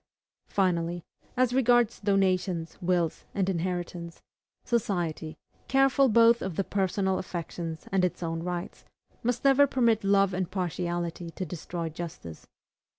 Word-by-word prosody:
Finally, 175 Hz, -3 st, 0 dB, 0.3 s
as 250 Hz, -1 st, +3 dB
regards 240 Hz, -3 st, +3 dB
donations, 185 Hz, -4 st, +1 dB
wills, 175 Hz, -2 st, 0 dB
and 195 Hz, -2 st, +1 dB
inheritance, 175 Hz, -1 st, -3 dB, 0.4 s
society, 175 Hz, -9 st, -1 dB, 0.3 s
careful 270 Hz, 0 st, +4 dB
both 230 Hz, +1 st, +5 dB
of 190 Hz, -3 st, -3 dB
the 195 Hz, -, 0 dB
personal 190 Hz, 0 st, 0 dB
affections 170 Hz, -2 st, -5 dB
and 190 Hz, -2 st, +2 dB
its 180 Hz, -1 st, -1 dB
own 165 Hz, 0 st, -2 dB
rights, 175 Hz, 0 st, -5 dB, 0.4 s
must 245 Hz, +2 st, -1 dB
never 275 Hz, +1 st, +6 dB
permit 235 Hz, -5 st, +2 dB
love 195 Hz, -1 st, +3 dB
and 185 Hz, -1 st, -2 dB
partiality 175 Hz, -2 st, -3 dB
to 185 Hz, +3 st, -5 dB
destroy 170 Hz, 0 st, -5 dB
justice. 160 Hz, -, -8 dB
185 Hz, 125 wpm, -28 LUFS, 170-210 Hz, 0.4 s, never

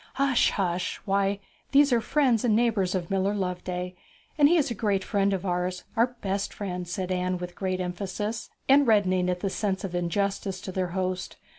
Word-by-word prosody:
'Hush, 275 Hz, -2 st, +3 dB
hush! 180 Hz, -2 st, -1 dB
Why, 200 Hz, 0 st, +1 dB, 0.4 s
these 280 Hz, -1 st, +6 dB
are 235 Hz, -, +3 dB
friends 250 Hz, -2 st, +2 dB
and 225 Hz, -4 st, +3 dB
neighbours 215 Hz, -5 st, +2 dB
of 175 Hz, -1 st, -3 dB
Miller 195 Hz, +1 st, +1 dB
Loveday, 180 Hz, -1 st, -3 dB, 0.4 s
and 290 Hz, -1 st, +6 dB
he 345 Hz, -, +5 dB
is 285 Hz, -6 st, +1 dB
a -, -, +1 dB
great 200 Hz, -3 st, 0 dB
friend 200 Hz, -1 st, +1 dB
of 195 Hz, -1 st, -2 dB
ours 180 Hz, 0 st, -1 dB
our 245 Hz, +2 st, +2 dB
best 195 Hz, 0 st, -1 dB
friend,' 180 Hz, -3 st, -4 dB
said 185 Hz, +1 st, -3 dB
Anne 180 Hz, 0 st, 0 dB
with 180 Hz, 0 st, -6 dB
great 185 Hz, -1 st, -2 dB
emphasis, 195 Hz, +5 st, -3 dB, 0.2 s
and 275 Hz, 0 st, +6 dB
reddening 185 Hz, -4 st, +3 dB
at 180 Hz, 0 st, -2 dB
the 195 Hz, -, 0 dB
sense 195 Hz, -3 st, -1 dB
of 190 Hz, -3 st, -4 dB
injustice 190 Hz, +2 st, -1 dB
to 195 Hz, -, -6 dB
their 185 Hz, 0 st, -1 dB
host. 185 Hz, 0 st, -2 dB
195 Hz, 190 wpm, -27 LUFS, 180-215 Hz, 0.4 s, these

